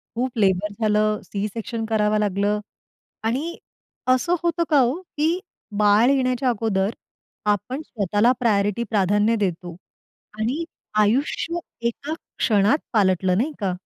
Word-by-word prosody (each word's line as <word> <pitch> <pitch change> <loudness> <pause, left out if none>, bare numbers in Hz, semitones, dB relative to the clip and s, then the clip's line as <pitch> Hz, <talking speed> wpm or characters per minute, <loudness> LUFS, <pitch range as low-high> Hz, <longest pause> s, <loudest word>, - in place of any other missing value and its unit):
खूप 245 0 -2
लेबर 200 0 +2
झालं, 215 0 +2
सी-सेक्शन 220 +3 -4
करावं 215 -1 +2
लागलं 205 +1 +1 0.7
आणि 280 +10 -1 0.5
असं 255 +8 +3
होतं 340 0 +1
का 295 - +5
हो 255 +8 +1 0.2
की 320 +4 +2 0.4
बाळ 210 +4 +5
येण्याच्या 255 -1 +1
अगोदर 205 -3 0 0.6
आपण 230 +9 -1
स्वतःला 210 - +1
प्रायोरिटी 210 0 +1
प्राधान्य 205 +2 +2
देतो 175 -4 -2 0.6
आणि 270 +10 -1 0.4
आयुष्य 275 +10 +1 0.3
एका 290 +6 -5 0.2
क्षणात 210 +5 +3
पालटलं, 185 -3 +2
नाही 295 +7 0
का? 195 -2 0
215 Hz, 115 wpm, -23 LUFS, 205-255 Hz, 0.7 s, का